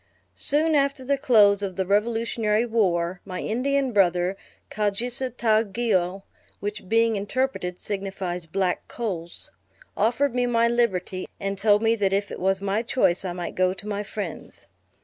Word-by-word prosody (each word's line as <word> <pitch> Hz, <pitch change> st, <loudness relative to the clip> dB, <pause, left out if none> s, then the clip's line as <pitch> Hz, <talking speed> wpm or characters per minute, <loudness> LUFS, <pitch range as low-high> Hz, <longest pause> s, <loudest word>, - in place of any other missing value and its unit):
Soon 310 Hz, +3 st, +1 dB
after 275 Hz, -2 st, +1 dB
the 280 Hz, +2 st, +2 dB
close 215 Hz, -8 st, +5 dB
of 195 Hz, -2 st, -3 dB
the 190 Hz, -, -1 dB
revolutionary 220 Hz, +2 st, +1 dB
war, 185 Hz, -6 st, 0 dB
my 185 Hz, -, -6 dB
Indian 270 Hz, +3 st, 0 dB
brother, 180 Hz, -2 st, +2 dB, 0.4 s
Kau 210 Hz, -1 st, +1 dB
jises 245 Hz, +4 st, -2 dB
tau 220 Hz, -2 st, +3 dB
ge 225 Hz, +1 st, -1 dB
au 185 Hz, +1 st, 0 dB, 0.4 s
(which 205 Hz, -2 st, -5 dB
being 230 Hz, 0 st, +3 dB
interpreted 200 Hz, -3 st, -2 dB
signifies 190 Hz, -4 st, -4 dB
Black 185 Hz, +2 st, -1 dB
Coals,) 180 Hz, -8 st, -5 dB, 0.4 s
offered 240 Hz, +5 st, +1 dB
me 245 Hz, 0 st, +1 dB
my 235 Hz, -1 st, +3 dB
liberty, 195 Hz, -6 st, 0 dB
and 195 Hz, 0 st, -2 dB
told 205 Hz, +2 st, +3 dB
me 225 Hz, 0 st, +4 dB
that 200 Hz, -4 st, +1 dB
if 200 Hz, +1 st, 0 dB
it -, -, -6 dB
was 190 Hz, +1 st, +1 dB
my 200 Hz, +2 st, 0 dB
choice 210 Hz, -7 st, +1 dB
I 180 Hz, -2 st, -3 dB
might 175 Hz, -1 st, -5 dB
go 185 Hz, 0 st, +1 dB
to 200 Hz, +2 st, -9 dB
my 205 Hz, -1 st, -2 dB
friends. 195 Hz, -, -6 dB
205 Hz, 165 wpm, -25 LUFS, 190-235 Hz, 0.4 s, close